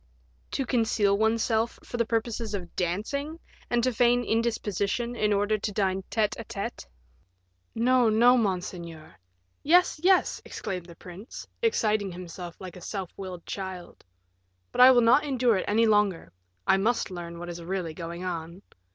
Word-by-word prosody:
"To 270 - -1
conceal 225 -5 +2
oneself 220 +1 +1
for 240 - -6
the 235 -1 +1
purposes 230 -1 -2
of 175 -3 -7
dancing, 280 - -2 0.3
and 240 -1 +1
to 255 0 +1
feign 245 +1 +3
indisposition 230 0 -1
in 210 -2 +1
order 205 +1 +1
to 210 - -3
dine 195 -2 0
tete 215 -2 +1
a - - -4
tete." 230 +1 -6 0.9
"No, 245 +1 +3
no, 235 +3 +5
monseigneur." 175 -7 -3 0.5
"Yes, 350 +1 +4
yes," 375 0 +3
exclaimed 180 -4 -5
the 170 - -12
prince, 185 +6 -10
exciting 215 - +1
himself 175 -1 -8
like 185 -2 -9
a 180 - -11
self 190 0 -5
willed 185 -3 -8
child; 190 -3 -7 0.7
"but - - +1
I 255 - +11
will 250 -2 +6
not 240 +5 +5
endure 255 -6 +2
it 185 - -2
any 225 +3 +3
longer, 205 - +2 0.3
I 190 - +4
must 220 +1 0
learn 170 -1 -7
what 175 +1 -7
is 170 0 -6
really 175 -1 -3
going 170 +2 -6
on." 170 +1 -5
210 Hz, 160 wpm, -27 LUFS, 180-235 Hz, 0.9 s, I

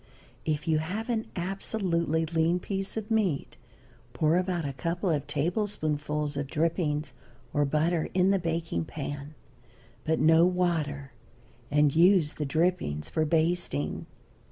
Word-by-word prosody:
If 150 -1 -1
you 155 -1 +3
have 200 +9 -4
an 225 -2 -1
absolutely 175 -3 -1
lean 165 +2 +1
piece 195 +3 -3
of 220 0 -5
meat 195 -10 0 0.6
pour 155 +1 +2
about 180 -3 -1
a 140 - -3
couple 170 +7 -1
of 145 -3 -1
tablespoonfuls 150 -4 -1
of 145 0 -2
drippings, 155 0 -1 0.4
or 145 0 +2
butter, 155 +3 +1
in 185 +1 +4
the 195 - +2
baking 165 - -2
pan, 145 - -6 0.7
but 160 0 +1
no 160 +1 +6
water, 165 -6 0 0.6
and 150 -1 +3
use 170 -2 +5
the 150 - -3
drippings 160 - 0
for 155 - 0
basting. 160 - 0
160 Hz, 130 wpm, -28 LUFS, 150-180 Hz, 0.7 s, no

